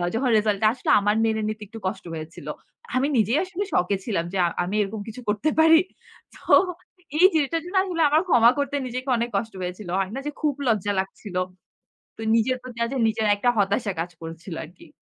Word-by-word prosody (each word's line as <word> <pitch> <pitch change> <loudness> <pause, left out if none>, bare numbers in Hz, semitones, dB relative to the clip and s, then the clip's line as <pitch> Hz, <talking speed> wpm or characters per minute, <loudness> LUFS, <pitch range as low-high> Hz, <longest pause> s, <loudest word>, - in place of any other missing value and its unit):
যখন 250 +2 +1
রিসাল্ট 210 -2 +1
টা - - +7
আসলো 255 - -5
আমার 205 +1 +1
মেনে 220 -1 0
নিতে 215 0 -5
একটু 225 +2 -10
কষ্ট 190 - -4
হয়েছিল। 160 +1 -8 0.5
আমি 260 +2 +2
নিজেই 225 +4 +3
আসলে 375 +1 -4
শকে 180 +3 +2
ছিলাম 190 -8 -1
যে - - -1 0.3
আমি 185 +4 -3
এরকম 205 +1 -3
কিছু 225 +3 -8
করতে 210 +9 +1
পারি। 320 0 +7 0.6
তো - - -16 0.8
এই 360 - +8
যেটার 315 +2 +1
জন্য 360 +3 -7
আসলে 355 -4 -2
আমার 305 +2 +4
ক্ষমা 240 -7 +6
করতে 285 0 -1
নিজেকে 255 +2 -5
অনেক 235 +1 -1
কষ্ট 220 +2 -3
হয়েছিল। 180 +1 -5
হয়না 195 +7 -2
যে - - -2
খুব 300 -2 +2
লজ্জা 205 -3 +1
লাগছিল। 190 0 -6 0.8
তো - - -11
নিজের 235 +3 +2
প্রতি 250 -2 -10 0.3
নিজের 220 0 0
একটা 245 +4 +2
হতাশা 200 +1 +1
কাজ 175 +1 -3
করছিল 165 +2 -7
আরকি। 175 - -15
220 Hz, 190 wpm, -24 LUFS, 195-260 Hz, 0.8 s, এই